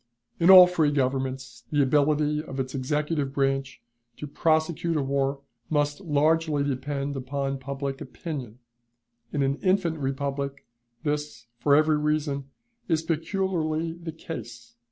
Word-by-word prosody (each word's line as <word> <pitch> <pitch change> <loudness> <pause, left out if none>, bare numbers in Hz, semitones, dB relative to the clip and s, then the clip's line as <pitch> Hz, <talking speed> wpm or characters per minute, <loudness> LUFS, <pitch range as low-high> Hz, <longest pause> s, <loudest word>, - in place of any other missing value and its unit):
In 170 +2 +4
all 185 -1 +12
free 170 -4 +2
governments, 130 -2 -2
the 145 -2 +3
ability 150 +2 +2
of 135 -3 -7
its 130 -1 -3
executive 150 +1 -1
branch 135 0 -1 0.3
to - - -6
prosecute 160 +2 +1
a 145 - 0
war 135 0 -1 0.3
must 145 +2 0
largely 155 -2 +2
depend 140 +1 -2
upon 135 +1 -3
public 140 +1 -4
opinion; 135 - -6 0.7
in 145 - 0
an 135 +1 0
infant 185 -4 +1
republic, 140 0 -3 0.4
this, 150 -4 -3
for 140 +4 +4
every 155 0 +3
reason, 150 -2 -1 0.4
is 160 -2 +1
peculiarly 165 -1 -1
the 170 -1 -7
case. 120 -8 -9
145 Hz, 130 wpm, -26 LUFS, 135-155 Hz, 0.7 s, all